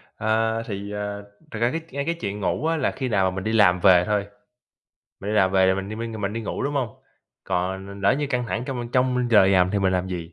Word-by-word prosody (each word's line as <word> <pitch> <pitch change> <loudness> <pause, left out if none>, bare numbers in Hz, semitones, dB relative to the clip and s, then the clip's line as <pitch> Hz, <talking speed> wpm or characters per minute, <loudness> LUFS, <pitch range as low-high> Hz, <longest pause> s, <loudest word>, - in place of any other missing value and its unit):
Ờ, 110 +1 0
thì, 100 -2 -6
ờ, 105 0 -4 0.3
thật 110 - -5
ra 120 +2 +2
cái 165 - -3
ngay 140 +1 -3
cái 170 - -1
chuyện 105 -10 -5
ngủ 125 +9 -1
á 165 0 +1
là 140 - 0
khi 130 -2 -4
nào 95 -3 +2
mà - - -8
mình 95 - -4
đi 110 - -1
làm 90 -5 +5
về 90 -1 +6
thôi, 105 -1 0 1.0
mình 100 - -4
đi - - -1
làm 95 -2 +3
về 95 -1 +4
rồi 95 +1 +3
mình 95 +1 -4
đi 110 - -6
minh, 115 0 -5
rồi 110 - -6
mình 100 +1 -2
đi 115 - -3
ngủ, 105 - -4
đúng 145 +1 -2
hông? 125 -5 -3 0.4
Còn 95 +2 -2
l 100 0 -9
lỡ 100 - +4
như 145 +1 -1
căng 125 -3 -1
thẳng 115 +1 -3
trong 125 -3 -4
trong 125 -1 +1
giờ 100 -4 +6
làm 90 -1 +4
thì 100 - 0
mình 95 -1 +1
làm 90 0 0
gì? 85 -2 -6
105 Hz, 280 wpm, -24 LUFS, 95-120 Hz, 1.0 s, về